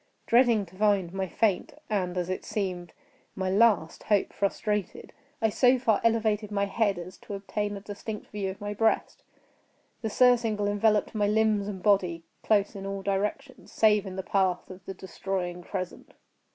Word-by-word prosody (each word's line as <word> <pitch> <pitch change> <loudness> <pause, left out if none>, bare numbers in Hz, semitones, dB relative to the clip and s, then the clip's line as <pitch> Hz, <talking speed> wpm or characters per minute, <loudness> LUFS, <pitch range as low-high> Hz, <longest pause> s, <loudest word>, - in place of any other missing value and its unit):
Dreading 235 -4 +4
to 180 +1 -18
find 200 -3 +2
my 190 0 -2
faint, 200 +1 0
and, 185 -4 -1
as 175 -1 -1
it 185 0 -3
seemed, 180 -4 -3 0.4
my 190 -1 -1
last 200 -6 +3
hope 205 -2 +1
frustrated, 205 0 -2 0.3
I 220 - +4
so 250 +4 +4
far 230 -4 +2
elevated 220 -2 +1
my 200 -1 0
head 200 -1 0
as 175 +1 -8
to 205 - -7
obtain 205 +1 -3
a - - -9
distinct 210 +1 -7
view 200 -2 -2
of 190 - -7
my 205 0 -4
breast. 220 +1 0 0.8
The 220 - -2
surcingle 225 -3 +3
enveloped 210 +2 +2
my 210 -2 +1
limbs 210 -1 +2
and 190 -3 -6
body 180 -5 +2 0.2
close 205 -2 +2
in 195 0 -6
all 195 0 -4
directions—save 210 0 0
in 185 - -6
the 190 - -4
path 190 -2 0
of 185 +1 -11
the 195 - -5
destroying 180 -1 -4
crescent. 180 +1 -6
205 Hz, 165 wpm, -28 LUFS, 190-215 Hz, 0.8 s, Dreading